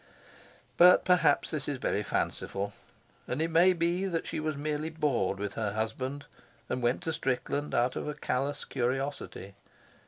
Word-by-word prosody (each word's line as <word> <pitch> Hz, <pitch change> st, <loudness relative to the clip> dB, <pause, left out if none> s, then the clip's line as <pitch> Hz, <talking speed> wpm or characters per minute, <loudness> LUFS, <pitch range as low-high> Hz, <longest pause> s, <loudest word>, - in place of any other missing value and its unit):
But 180 Hz, +1 st, +7 dB
perhaps 165 Hz, -5 st, +3 dB
this 155 Hz, -4 st, -3 dB
is 145 Hz, -, -2 dB
very 105 Hz, -, 0 dB
fanciful; 100 Hz, -1 st, -2 dB, 0.5 s
and 125 Hz, -, -2 dB
it 165 Hz, +1 st, 0 dB
may 175 Hz, +3 st, +6 dB
be 175 Hz, +2 st, 0 dB
that 170 Hz, -3 st, -2 dB
she -, -, -3 dB
was 155 Hz, -1 st, -2 dB
merely 150 Hz, +1 st, -2 dB
bored 145 Hz, -12 st, 0 dB
with 100 Hz, 0 st, -4 dB
her 105 Hz, -3 st, -2 dB
husband 130 Hz, +6 st, -3 dB, 0.4 s
and 125 Hz, -, -1 dB
went 120 Hz, +1 st, +1 dB
to 160 Hz, -, -1 dB
Strickland 145 Hz, 0 st, -1 dB
out 125 Hz, +2 st, +2 dB
of -, -, -3 dB
a 150 Hz, -, -3 dB
callous 140 Hz, 0 st, -2 dB
curiosity. 130 Hz, -5 st, -3 dB
145 Hz, 160 wpm, -30 LUFS, 125-160 Hz, 0.5 s, But